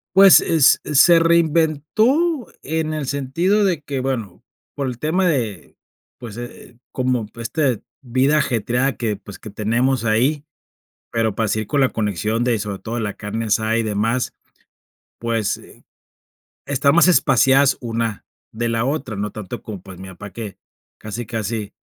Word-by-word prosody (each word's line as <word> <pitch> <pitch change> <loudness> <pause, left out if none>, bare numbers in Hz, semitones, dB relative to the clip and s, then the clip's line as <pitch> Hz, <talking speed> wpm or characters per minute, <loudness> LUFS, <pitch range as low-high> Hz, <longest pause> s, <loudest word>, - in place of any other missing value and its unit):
Pues, 195 -1 +8
es 160 -5 +4
se 150 +4 +5
reinventó 170 - +2 0.2
en 155 +1 -2
el 150 -4 -3
sentido 165 +10 +1
de 175 -6 +1
que, 140 -3 -4
bueno, 115 -9 -4 0.3
por 140 -2 -2
el 125 -2 -5
tema 175 +5 +1
de, 120 - -2 0.4
pues, 115 -4 -8
eh, 120 0 -10
como 125 -4 -1
esta 120 +1 -1 0.2
vida 130 +4 +2
ajetreada 125 0 0
que, 110 -3 -1
pues, 100 0 -12
que 110 - -9
tenemos 115 +4 0
ahí, 125 +7 +1 0.7
pero 110 -2 0
para 110 +1 -1
seguir 110 +1 -1
con 140 -2 +1
la 130 - +4
conexión 110 +2 -1
de, 120 -3 +1
sobre 100 -1 -4
todo, 115 +4 -5
la 105 -2 -3
carne 110 +2 -4
asada 110 +1 +1
y 115 - +1
demás, 110 +4 -1 0.9
pues, 115 -3 -1
eh, - - -17 0.8
está 140 0 +2
más 175 +4 +5
espaciadas 135 -4 +4
una 115 -3 -3 0.3
de 115 +1 -2
la 115 0 0
otra, 135 -4 -2
no 105 +1 -3
tanto 105 -4 -7
como, 100 -5 -7
pues, 95 -2 -12
mi 95 0 -9
papá 100 +2 -10
que 110 -4 -7 0.4
casi 110 +3 -6
casi, 110 -1 -4
120 Hz, 155 wpm, -20 LUFS, 110-145 Hz, 0.9 s, Pues